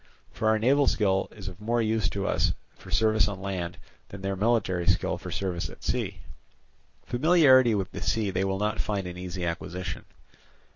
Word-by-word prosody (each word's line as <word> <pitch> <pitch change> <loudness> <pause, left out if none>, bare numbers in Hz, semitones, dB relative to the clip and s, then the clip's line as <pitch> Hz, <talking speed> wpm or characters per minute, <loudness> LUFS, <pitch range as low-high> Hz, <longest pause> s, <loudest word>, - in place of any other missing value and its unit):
For 110 - -2
our 110 0 +4
naval 135 +6 +3
skill 95 -3 +2
is - - -10
of 95 +1 -8
more 120 +3 0
use 110 -1 +1
to 100 -1 -3
us - - +1 0.2
for - - -14
service 110 -1 +3
on 100 -2 -4
land, 90 -3 -4 0.3
than 100 - -9
their 95 0 -1
military 100 -4 +1
skill - - +1
for - - -7
service 90 -3 -2
at - - -14
sea. - - -2 0.8
Familiarity 130 -4 +5
with 95 -2 -2
the - - -7
sea 105 -3 0
they 95 +1 0
will 95 0 0
not 105 +1 -1
find 100 -3 -2
an 90 0 -6
easy 90 0 -5
acquisition. 85 +1 -4
100 Hz, 185 wpm, -27 LUFS, 95-110 Hz, 0.8 s, Familiarity